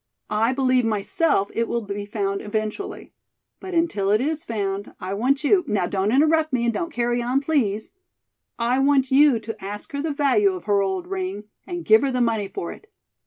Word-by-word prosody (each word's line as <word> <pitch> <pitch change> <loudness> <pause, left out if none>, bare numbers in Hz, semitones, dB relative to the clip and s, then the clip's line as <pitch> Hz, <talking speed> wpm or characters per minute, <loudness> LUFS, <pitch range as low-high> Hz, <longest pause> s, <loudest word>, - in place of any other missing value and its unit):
I 220 +3 +2
believe 255 -1 +2
myself 215 +2 0
it 230 0 0
will 235 - -1
be 205 0 -5
found 200 -2 -2
eventually. 215 - -4 0.5
But 375 -2 -6
until 310 -13 +1
it 210 +1 +4
is 310 +4 -1
found, 200 -3 -3
I 185 +1 -4
want 265 +8 +1
you 360 +5 +4
now 205 -6 +1
don't 195 +3 0
interrupt 310 +3 +3
me 240 -2 0
and 235 - +1
don't 340 +5 -2
carry 240 0 0
on, 250 +3 +1
please 255 -8 -1 0.7
I 245 +2 +1
want 270 -1 +3
you 280 -2 +6
to 220 -2 -8
ask 205 +1 -6
her 280 0 -3
the 315 +1 -2
value 300 +8 +2
of 370 - -7
her 205 -1 +2
old 190 -2 -2
ring 190 +2 -4 0.2
and 350 -2 -5
give 220 +1 +6
her 275 - +1
the 255 -1 -1
money 225 -4 +1
for 175 -3 -5
it. 425 - -13
235 Hz, 200 wpm, -23 LUFS, 205-285 Hz, 0.7 s, you